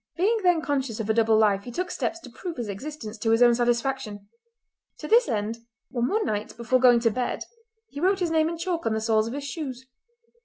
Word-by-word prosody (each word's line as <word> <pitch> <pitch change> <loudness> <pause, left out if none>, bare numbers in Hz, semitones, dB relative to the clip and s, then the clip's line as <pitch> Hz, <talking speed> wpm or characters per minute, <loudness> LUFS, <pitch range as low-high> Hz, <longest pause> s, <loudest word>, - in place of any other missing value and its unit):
Being 430 +6 +2
then 355 -4 +3
conscious 265 -6 -2
of 220 0 0
a - - +2
double 225 -1 +3
life 205 -2 +3
he 245 - -9
took 360 +7 -3
steps 335 - -2
to 260 - -11
prove 345 +5 -7
its 240 -3 -3
existence 225 0 -7
to 225 - -1
his 225 +2 +5
own 240 -1 +6
satisfaction. 240 -3 -1 0.7
To - - -7
this 465 +1 +4
end 220 +1 -2 0.4
on 240 0 +1
one 430 +7 0
night 210 +1 -3
before 235 +2 +1
going 245 -2 +6
to 230 -1 +3
bed 250 +3 -2 0.4
he 285 - -8
wrote 380 +2 +3
his 355 -3 -1
name 320 0 +3
in 335 - -4
chalk 340 -4 -2
on 220 - +1
the - - 0
soles 220 0 +2
of 235 - -5
his 285 - -5
shoes. 270 -4 -6
245 Hz, 230 wpm, -25 LUFS, 225-320 Hz, 0.7 s, own